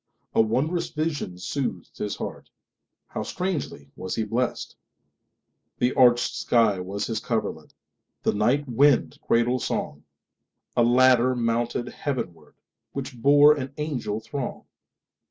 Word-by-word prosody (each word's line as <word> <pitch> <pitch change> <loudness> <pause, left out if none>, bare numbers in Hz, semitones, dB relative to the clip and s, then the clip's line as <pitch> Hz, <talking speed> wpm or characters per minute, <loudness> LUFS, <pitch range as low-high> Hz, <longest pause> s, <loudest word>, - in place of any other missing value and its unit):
A - - +5
wondrous 140 +10 0
vision 155 - -3
soothed 95 -1 -4
his 105 - -3
heartHow - - -9
strangely 155 - -4
was 95 - -4
he 110 - 0
blessed! 120 +4 -2 1.0
The 125 +1 +1
arched 120 -2 +4
sky 110 -5 +2
was 95 +3 -3
his 110 -2 -2
coverlet, 115 -1 -3 0.5
The - - +2
night 125 +8 +1
wind 135 +2 +3
cradle 120 +2 +2
song;A 75 +6 -5
ladder 125 +1 +5
mounted 120 0 0
heavenwardWhich 125 - -7
bore 145 +3 +7
an 135 -2 -5
angel 130 -9 -2
throng. 125 +3 -5
120 Hz, 110 wpm, -25 LUFS, 110-140 Hz, 1.0 s, bore